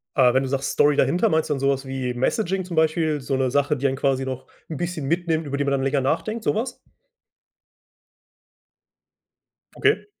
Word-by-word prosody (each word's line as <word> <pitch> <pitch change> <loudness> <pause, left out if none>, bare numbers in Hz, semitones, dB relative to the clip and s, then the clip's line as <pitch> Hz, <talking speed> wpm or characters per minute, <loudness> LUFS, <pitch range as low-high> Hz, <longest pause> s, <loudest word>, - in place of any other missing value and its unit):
Ah, 125 -3 +5
wenn 130 - +2
du 135 - -3
sagst 135 +1 -1
Story 145 0 +3
dahinter, 175 +5 +2
meinst 160 0 +1
du 150 - +2
dann 135 - -3
so 135 +1 +1
was 135 0 -1
wie 130 -2 -3
Messaging 185 - -1
zum 175 -2 -6
Beispiel? 160 -2 +1
So 135 +1 -1
'ne 130 -1 0
Sache, 145 +2 +1
die 140 +2 +1
einen 135 - -1
quasi 135 -1 0
noch 130 -1 -6 0.2
'n 160 - -5
bisschen 175 -3 -3
mitnimmt, 165 0 0
über 140 0 -3
die 140 - 0
man 140 - -1
dann 135 -1 0
länger 135 +1 +1
nachdenkt, 215 - -1
so - - +1
was? 230 +5 -3 3.0
Okay. 425 - +2
140 Hz, 200 wpm, -23 LUFS, 135-165 Hz, 3.0 s, Ah